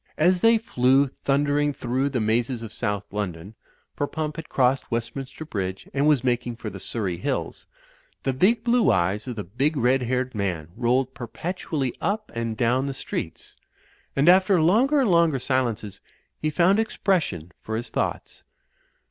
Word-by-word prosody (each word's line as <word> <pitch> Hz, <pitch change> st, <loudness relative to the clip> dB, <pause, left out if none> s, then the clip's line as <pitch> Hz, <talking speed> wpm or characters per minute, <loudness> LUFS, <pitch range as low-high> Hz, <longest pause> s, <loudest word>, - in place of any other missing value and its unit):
As 175 Hz, +3 st, +3 dB
they 230 Hz, 0 st, +6 dB
flew 135 Hz, -, +2 dB, 0.2 s
thundering 145 Hz, +1 st, +2 dB
through 130 Hz, +2 st, -1 dB
the 130 Hz, -3 st, -1 dB
mazes 115 Hz, +2 st, 0 dB
of 110 Hz, -, -8 dB
South 105 Hz, -3 st, -3 dB
London 95 Hz, -1 st, -4 dB, 0.4 s
(for 145 Hz, -, -1 dB
Pump 155 Hz, 0 st, -4 dB
had 160 Hz, -, -7 dB
crossed 130 Hz, 0 st, +1 dB
Westminster 130 Hz, +5 st, -4 dB
Bridge 95 Hz, -8 st, -4 dB
and 140 Hz, +2 st, +2 dB
was 145 Hz, -5 st, +3 dB
mak 125 Hz, -1 st, 0 dB
ing 120 Hz, -, -4 dB
for 110 Hz, -2 st, -6 dB
the 95 Hz, -, -8 dB
Surrey 95 Hz, -3 st, -2 dB
hills), 90 Hz, -, -3 dB, 0.6 s
the 135 Hz, -, 0 dB
big 215 Hz, -, +3 dB
blue 235 Hz, -, +3 dB
eyes 95 Hz, +3 st, 0 dB
of 125 Hz, -, -4 dB
the 105 Hz, -, -4 dB
big 135 Hz, -, -1 dB
red 130 Hz, +1 st, +3 dB
haired 125 Hz, +1 st, -1 dB
man 90 Hz, -7 st, -2 dB
rolled 125 Hz, +2 st, +1 dB
perpetually 140 Hz, -, -4 dB
up 215 Hz, +1 st, -2 dB
and 115 Hz, -1 st, -3 dB
down 125 Hz, +4 st, +1 dB
the 135 Hz, -, -4 dB
streets; -, -, -6 dB, 0.6 s
and, 140 Hz, +3 st, +2 dB
after 185 Hz, +1 st, +6 dB
longer 240 Hz, -, +4 dB
and 235 Hz, -7 st, +2 dB
longer 170 Hz, -4 st, +4 dB
silences, 120 Hz, -6 st, -2 dB, 0.4 s
he 155 Hz, -, +1 dB
found 180 Hz, +6 st, +3 dB
expression 180 Hz, -, -1 dB
for 110 Hz, -, -4 dB
his 115 Hz, +2 st, -4 dB
thoughts. -, -, -3 dB
130 Hz, 165 wpm, -24 LUFS, 115-155 Hz, 0.6 s, they